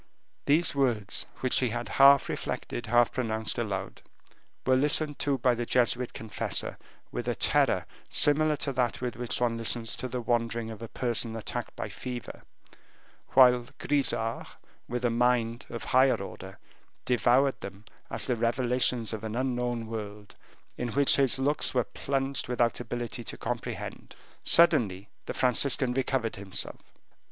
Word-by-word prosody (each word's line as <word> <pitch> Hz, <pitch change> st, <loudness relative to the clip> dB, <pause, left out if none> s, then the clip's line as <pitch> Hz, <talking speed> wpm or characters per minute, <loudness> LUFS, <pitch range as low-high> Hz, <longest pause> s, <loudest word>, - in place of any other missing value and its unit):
These 160 Hz, +4 st, +3 dB
words, 120 Hz, -8 st, 0 dB
which 130 Hz, -, +3 dB
had 125 Hz, -, +1 dB
been 120 Hz, +2 st, -4 dB
half 140 Hz, 0 st, +7 dB
reflected, 120 Hz, -, -4 dB
half 120 Hz, +1 st, +4 dB
pronounced 110 Hz, -3 st, -1 dB
aloud, 95 Hz, -4 st, -4 dB, 0.6 s
were 130 Hz, -, +4 dB
listened 150 Hz, +2 st, +1 dB
to 140 Hz, -2 st, +1 dB
by 125 Hz, 0 st, +2 dB
the 120 Hz, 0 st, -2 dB
Jesuit 125 Hz, 0 st, +2 dB
confessor 110 Hz, -1 st, -3 dB, 0.3 s
with -, -, -4 dB
a -, -, 0 dB
terror -, -, +2 dB, 0.2 s
similar 150 Hz, +1 st, +3 dB
to 140 Hz, -, -2 dB
that 125 Hz, -2 st, 0 dB
with 125 Hz, -2 st, -3 dB
which 120 Hz, 0 st, -2 dB
one 120 Hz, -1 st, 0 dB
listens 115 Hz, 0 st, 0 dB
to 130 Hz, -, -3 dB
the 125 Hz, 0 st, -4 dB
wanderings 115 Hz, -1 st, -1 dB
of 110 Hz, -, -9 dB
a 115 Hz, -, -6 dB
person 115 Hz, -1 st, -2 dB
attacked 110 Hz, -, -5 dB
by -, -, -4 dB
fever, 125 Hz, -2 st, -7 dB, 0.9 s
whilst 125 Hz, -2 st, +5 dB
Grisart, 125 Hz, -5 st, 0 dB, 0.4 s
with 125 Hz, 0 st, -2 dB
a 120 Hz, -, +2 dB
mind 120 Hz, 0 st, +1 dB
of 115 Hz, -, -6 dB
higher 130 Hz, +1 st, +4 dB
order, 95 Hz, 0 st, -9 dB, 0.5 s
devoured 125 Hz, +3 st, +2 dB
them 100 Hz, +1 st, -9 dB, 0.2 s
as -, -, 0 dB
the 125 Hz, -, 0 dB
revelations 120 Hz, 0 st, +1 dB
of 110 Hz, -1 st, -5 dB
an 110 Hz, 0 st, -4 dB
unknown 120 Hz, -2 st, -1 dB
world, 105 Hz, -2 st, -7 dB, 0.5 s
in 120 Hz, -, -1 dB
which 140 Hz, 0 st, +5 dB
his 135 Hz, -2 st, +4 dB
looks 140 Hz, +1 st, 0 dB
were 125 Hz, -, +3 dB
plunged 135 Hz, +1 st, -3 dB
without 120 Hz, -1 st, 0 dB
ability 120 Hz, 0 st, -4 dB
to -, -, -5 dB
comprehend. -, -, -5 dB, 0.3 s
Suddenly 105 Hz, -, +4 dB, 0.2 s
the -, -, -4 dB
Franciscan 125 Hz, 0 st, +2 dB
recovered 130 Hz, -4 st, -1 dB
himself. 95 Hz, -1 st, -4 dB
120 Hz, 150 wpm, -28 LUFS, 115-130 Hz, 0.9 s, half